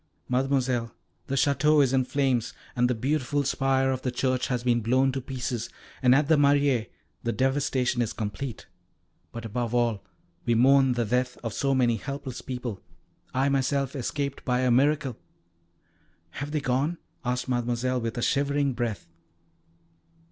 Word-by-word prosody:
Mademoiselle, 125 -2 0 0.4
the 135 - -1
Château 145 +2 +4
is 135 -1 +1
in 130 -1 +3
flames, 130 -3 0 0.2
and 125 0 +2
the 125 - +1
beautiful 145 +3 0
spire 135 -1 +1
of 130 -1 -2
the 130 - -1
church 130 0 0
has 125 -2 -1
been 120 -1 +2
blown 130 +4 +2
to 135 +1 -3
pieces, 125 -3 -4 0.3
and 125 -1 +6
at 145 +1 +3
the 160 - +5
Mairie 140 -4 +3 0.3
the 120 - -1
devastation 130 -1 +1
is 115 - -1
complete. 110 +3 -5 0.7
But, 115 -1 -7
above 120 +2 -2
all, 120 -4 +1 0.4
we 120 - +2
mourn 135 +2 +5
the 120 -1 0
death 125 +3 0
of 115 -3 -3
so 135 +4 +1
many 120 -3 +2
helpless 135 +2 -6
people 125 -6 -5 0.5
I 135 +2 +1
myself 140 0 0
escaped 140 +1 -3
by 125 -1 +1
a 130 -1 +2
miracle." 135 0 +2 1.1
"Have 145 +10 -5
they 150 0 -1
gone?" 135 +6 0 0.3
asked 125 0 -1
Mademoiselle, 125 0 0
with 115 +1 -3
a 120 - -1
shivering 140 0 +1
breath. 120 -7 -3
130 Hz, 155 wpm, -27 LUFS, 120-140 Hz, 1.1 s, and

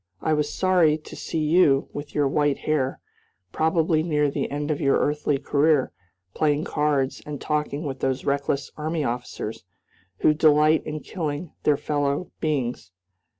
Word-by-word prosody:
I 155 - 0
was 150 -1 0
sorry 180 -5 +3
to 155 - -12
see 165 - -4
you, 150 -4 +4
with 145 0 -7
your 145 -2 +3
white 145 0 +1
hair, 140 -4 -1 0.5
probably 160 0 +2
near 150 -3 +1
the - - -2
end 145 +1 -2
of 150 - -2
your 140 -2 +3
earthly 145 -1 0
career, 145 0 +2 0.4
playing 150 0 +1
cards 145 -4 0
and 150 -2 -6
talking 150 0 -2
with 135 -3 -4
those 130 0 -1
reckless 140 0 -1
army 155 +1 -2
officers, 120 -4 -4 0.6
who 155 - +5
delight 155 0 +4
in 155 0 -4
killing 155 -2 -4
their 150 -2 +4
fellow 145 +2 -1
beings. 130 - -2
150 Hz, 150 wpm, -24 LUFS, 140-155 Hz, 0.6 s, who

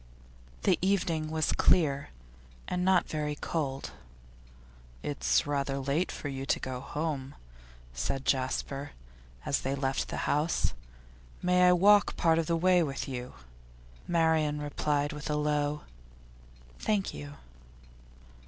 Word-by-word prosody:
The - - +3
evening 175 -5 +1
was 155 -1 0
clear, 140 -5 +3 0.6
and 180 0 -1
not 185 -1 +3
very 150 -1 -2
cold. 140 -4 -3 1.1
'It's 60 0 +1
rather 140 -1 -1
late 140 +6 0
for - - -6
you 135 -1 -4
to - - +1
go 130 -1 -4
home,' 140 -1 -4 0.6
said 65 - -2
Jasper, 135 +1 -1 0.5
as 140 - +1
they 135 +1 -1
left 135 0 -1
the - - -3
house. 150 +3 +1 0.7
'May 180 0 +5
I 180 - +7
walk 205 +3 +5
part 165 -1 +3
of 165 - -1
the 170 - +2
way 180 +1 +4
with 140 -4 -2
you?' 125 - -6 0.7
Marian 160 -3 +2
replied 145 0 -1
with 150 +1 -6
a 150 - +1
low 150 0 0 1.0
'Thank 205 -3 0
you. 145 0 -8
150 Hz, 125 wpm, -30 LUFS, 135-165 Hz, 1.1 s, I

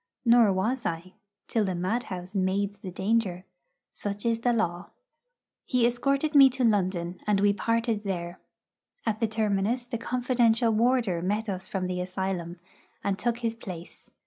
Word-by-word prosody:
Nor 235 -3 +6
was 225 +7 0
I 170 +3 -4 0.3
till 225 - +1
the 190 -2 -1
madhouse 185 -1 -3
made 195 +1 0
the 190 - -6
danger. 190 -1 -1 0.5
Such 205 +1 -5
is 230 -1 +1
the 245 +1 +2
law. 175 -6 -1 0.7
He 250 -3 +2
escorted 275 +5 +1
me 275 -2 +9
to 260 - +1
London, 185 -5 +1
and 205 -2 +3
we 200 0 +4
parted 230 +1 0
there. 175 -3 -4 0.7
At 215 -1 0
the 225 - +2
terminus 220 +2 0
the 240 -2 -4
confidential 240 -1 +2
warder 225 -5 +2
met 210 +5 -1
us 190 -1 -4
from 190 -2 -2
the 180 0 -2
asylum, 180 -2 -3 0.4
and 195 -1 -1
took 240 -1 0
his 230 -1 0
place. 180 -7 -10
205 Hz, 155 wpm, -27 LUFS, 185-235 Hz, 0.7 s, me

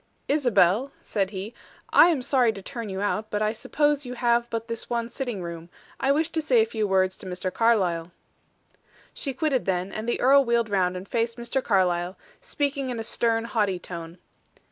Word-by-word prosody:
"Isabel," 250 - +3
said 195 -3 -1
he, 200 +3 -6 0.4
"I - - +8
am 310 -7 +1
sorry 255 -4 +3
to 195 - -8
turn 230 -1 -6
you 190 0 -4
out, 215 +1 -1
but 210 0 -1
I 215 - +2
suppose 290 +5 0
you 250 -1 -6
have 235 -1 +1
but 230 0 -4
this 230 -1 -5
one 235 0 -2
sitting 245 -9 -4
room. 170 0 -7 0.3
I 270 - +2
wish 310 +3 +1
to 325 -1 -1
say 265 -6 +3
a 220 - +5
few 220 -2 -2
words 190 -1 +2
to 190 - -10
Mr. 180 0 -4
Carlyle." 180 -7 +1 1.0
She 270 -2 -5
quitted 275 -3 0
them, 185 0 -1
and 220 +2 -3
the - - 0
earl 275 +2 +6
wheeled 235 -3 +1
round 185 -2 +1
and 185 +2 -8
faced 230 0 -1
Mr. 240 +2 -2
Carlyle, 180 -3 +1 0.2
speaking 280 - -2
in 245 - -3
a - - -3
stern, 225 0 +1
haughty 210 -5 0
tone. 170 -1 -8
225 Hz, 195 wpm, -25 LUFS, 190-255 Hz, 1.0 s, I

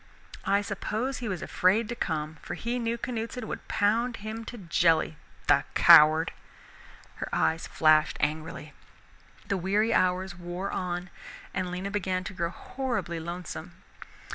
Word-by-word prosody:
I 200 +1 +3
suppose 220 +6 -3
he 240 - -4
was 185 -3 -3
afraid 205 +5 +2
to 240 - -3
come, 155 -5 -3
for - - -5
he 240 +2 -2
knew 230 0 -1
Canuteson 235 0 -4
could - - -6
pound 225 +4 +1
him 215 +2 -6
to 240 - -7
jelly, 165 -4 +2 0.3
the - - +4
coward!" 155 +2 +7 0.8
Her - - -4
eyes 160 +1 +1
flashed 155 -1 +4
angrily. 155 0 -3 0.7
The 195 - 0
weary 205 +5 +1
hours 185 0 +1
wore 175 +2 -5
on 180 0 -3 0.4
and 185 -1 -2
Lena 185 +2 -4
began 185 -2 -1
to 185 - -6
grow 170 -2 -1
horribly 240 -4 -3
lonesome. 170 0 -6
185 Hz, 140 wpm, -28 LUFS, 170-220 Hz, 0.8 s, coward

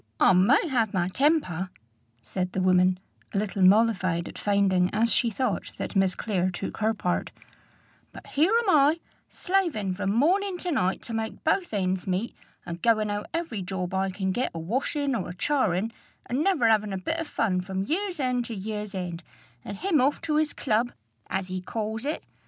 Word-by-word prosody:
"I - - +6
may 205 - +4
have 230 -8 0
my 180 -1 +1
temper," 190 - +1 0.5
said 185 -1 -3
the 190 - 0
woman, 185 0 +4 0.4
a - - +2
little 200 -1 -1
mollified 185 -3 +4
at - - -9
finding, 195 -3 +2
as 225 +2 +2
she 235 - +2
thought, 215 -3 -2
that - - -5
Miss 190 -1 +3
Clare 185 -5 0
took 185 +2 -5
her 220 +1 +1
part; 180 -3 -1 0.8
"but - - -12
here 315 +7 +2
am 420 - 0
I, 300 +1 +4 0.3
slaving 335 - 0
from 200 +1 -2
morning 360 - +2
to 355 0 -3
night 190 - 0
to 230 - -5
make 225 0 -4
both 350 +3 +1
ends 190 -2 -1
meet, 190 +5 -1 0.3
and 170 0 -6
goin' 215 -3 +2
out 205 0 -3
every 330 - -3
job 185 0 -4
I 190 0 +1
can 190 0 -2
get 245 +7 0
a - - -3
washin' 270 - -1
or 235 - -2
a 175 - -7
charin', 225 -5 +1 0.3
and 260 +5 -1
never 325 -12 +3
'avin' 215 -2 +2
a - - -1
bit 320 - -2
of 330 - -3
fun 185 -9 0
from 190 +1 -3
year's 360 - -2
end 250 -2 0
to 230 - -5
year's 210 0 -5
end, 175 -2 -4 0.4
and 200 - -6
him 355 - +2
off 280 +3 +2
to 310 -2 0
his 305 -1 +2
club, 235 0 0 0.3
as 190 -1 -3
he 185 0 -3
calls 220 +4 -4
it! 300 +2 -2
215 Hz, 190 wpm, -26 LUFS, 185-275 Hz, 0.8 s, I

